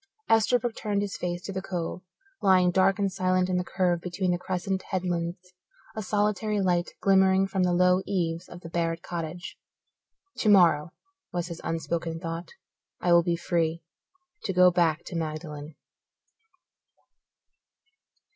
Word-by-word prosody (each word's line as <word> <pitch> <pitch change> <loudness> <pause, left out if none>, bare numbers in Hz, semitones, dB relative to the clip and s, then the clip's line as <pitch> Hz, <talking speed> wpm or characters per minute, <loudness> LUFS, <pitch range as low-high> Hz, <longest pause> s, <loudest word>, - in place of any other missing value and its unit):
Esterbrook 230 +1 +3
turned 205 -2 -1
his 200 - -4
face 175 0 -4
to 195 - -5
the 190 - -3
Cove, 180 -1 -4 0.4
lying 185 -2 +4
dark 190 +1 +3
and 200 -1 0
silent 185 -1 +1
in 180 - +1
the 180 - 0
curve 180 -2 0
between 180 +1 -1
the 175 - 0
crescent 190 +1 -2
headlands. 180 -1 -3 0.4
A 220 - -3
solitary 210 +1 0
light 175 -2 0
glimmered 190 0 +4
from 190 - 0
the 180 -1 +2
low 180 +1 +4
eaves 170 -3 -2
of 175 - -10
the 165 - -9
Barrett 165 0 -2
cottage. 170 0 -6 0.8
Tomorrow, 175 -7 +4 0.4
was 175 0 -3
his 170 - -7
unspoken 165 0 -3
thought, 165 0 -5 0.5
I 175 - +2
will 170 - +7
be 170 0 0
free; 170 -1 -1 0.6
to 195 - 0
go 180 0 +6
back 170 -3 +1
to - - -7
Magdalen. 155 -2 -5
180 Hz, 145 wpm, -27 LUFS, 170-190 Hz, 0.8 s, will